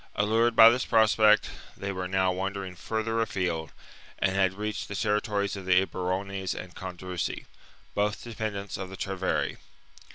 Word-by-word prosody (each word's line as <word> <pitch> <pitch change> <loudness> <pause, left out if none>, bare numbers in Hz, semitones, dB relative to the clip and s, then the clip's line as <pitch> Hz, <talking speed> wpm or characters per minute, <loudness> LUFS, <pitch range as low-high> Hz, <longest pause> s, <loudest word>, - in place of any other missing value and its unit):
Allured 115 +3 +2
by 115 - +10
this 125 +2 +1
prospect, 110 -1 +4 0.3
they 100 0 -3
were 95 -1 -3
now 95 0 +2
wandering 95 0 -3
further 110 +4 -2
afield 90 -7 -2 0.5
and 95 - +1
had 95 -1 +3
reached 105 +2 -4
the 100 - -6
territories 105 -1 0
of 95 -2 -8
the 90 -1 +6
Eburones 95 +1 -3
and 90 -1 -8
Condrusi, 90 -1 -5 0.2
— - - -29
both 105 +1 -1
dependents 105 -4 -4
of 95 -1 -6
the 95 - -9
Treveri. 95 -1 -1
100 Hz, 155 wpm, -28 LUFS, 95-105 Hz, 0.5 s, by